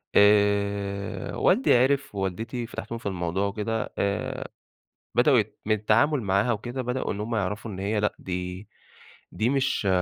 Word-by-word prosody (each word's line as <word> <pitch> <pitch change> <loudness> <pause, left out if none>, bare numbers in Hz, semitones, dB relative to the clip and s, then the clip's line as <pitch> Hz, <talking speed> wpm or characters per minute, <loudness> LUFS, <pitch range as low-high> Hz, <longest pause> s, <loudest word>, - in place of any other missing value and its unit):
آآ 100 -1 +2
والدي - - +4
عِرف 135 0 +2
ووالدتي، 110 +6 -3
فاتحتهم 115 -1 -6
في - - -14
الموضوع 95 0 -1
وكده، 110 +2 -3
آآ، 100 +1 -2 0.7
بدأوا - - +5
يت - - -4
من 110 0 +3
التعامل 115 +7 +2
معاها 100 +3 +2
وكده، 120 +4 -3
بدأوا 125 +1 -2
إن 100 - -4
هُم 115 +2 -2
يعرفوا 105 +2 -2
إن 95 - -7
هي 105 +2 0
لأ 105 0 0
دي 90 +2 -5 0.7
دي 115 +3 +1
مش 135 -6 +1
105 Hz, 150 wpm, -26 LUFS, 100-115 Hz, 0.7 s, بدأوا